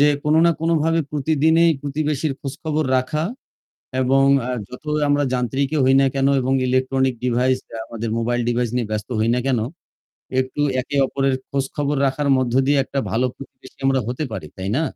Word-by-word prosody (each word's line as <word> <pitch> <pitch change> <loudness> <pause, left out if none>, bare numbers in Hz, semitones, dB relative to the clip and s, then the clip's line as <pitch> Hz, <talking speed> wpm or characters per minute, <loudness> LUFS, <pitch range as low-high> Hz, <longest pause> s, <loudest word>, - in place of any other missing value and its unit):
যে 145 - +6 0.2
কোনো 150 +1 +3
না - - +5
কোনভাবে 165 0 +2
প্রতিদিনই 160 +3 +3
প্রতিবেশীর 145 0 -1
খোঁজখবর 155 +2 -3
রাখা 140 +5 -1 0.8
এবং 135 +1 +3 0.2
আ - - -1 0.2
যত 125 +4 -11 0.2
আমরা 145 0 +2
যান্ত্রিকই 135 +4 0
হই 135 +1 +4
না 135 - +4
কেনো 135 0 +2
এবং 130 +1 0
ইলেকট্রনিক 130 0 +1
ডিভাইসটা 125 -1 0
আমাদের 115 -1 -5
মোবাইল 120 +1 0
ডিভাইস 120 -1 0
নিয়ে 120 -4 -1
ব্যস্ত 105 -1 -3
হই 110 +1 +1
না 125 - 0
কেনো, 125 -5 +1 0.8
একটু 130 +3 -4 0.2
একে 135 +3 -5
অপরের 135 0 0 0.2
খোঁজখবর 140 +1 -1
রাখার 140 +2 -1
মধ্য 130 -2 0
দিয়ে 145 0 +3
একটা 140 - -4
ভালো 125 +3 +1
প্রতিবেশী 135 -1 -14
আমরা 135 -1 +3
হতে 125 +5 -2
পারি, 80 - -5
তাই 95 0 -4
না? 155 - +1
135 Hz, 170 wpm, -21 LUFS, 125-145 Hz, 0.8 s, যে